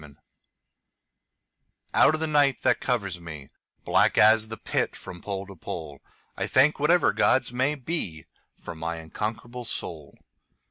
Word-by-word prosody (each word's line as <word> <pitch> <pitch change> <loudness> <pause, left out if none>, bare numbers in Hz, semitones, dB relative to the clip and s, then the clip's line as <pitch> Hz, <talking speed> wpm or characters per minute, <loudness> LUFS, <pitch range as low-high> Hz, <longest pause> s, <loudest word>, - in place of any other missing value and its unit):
Invictus 70 -2 -17 1.7
OUT 155 - +5
of 155 - -6
the - - +1
night 145 -4 +2
that - - +3
covers 100 -8 -1
me, 80 -5 -9 0.4
Black - - +3
as 110 +1 +6
the 110 0 -7
Pit - - -2
from 90 -1 -10
pole 100 -1 -4
to 100 0 -12
pole,I 80 -4 -8
thank 145 +4 +3
whatever 155 +3 +3
gods 130 -1 +2
may 130 +4 +1
beFor 125 - -4 0.5
my 80 +1 -4
unconquerable 110 +9 -5
soul. 80 - -5
110 Hz, 135 wpm, -26 LUFS, 85-130 Hz, 1.7 s, as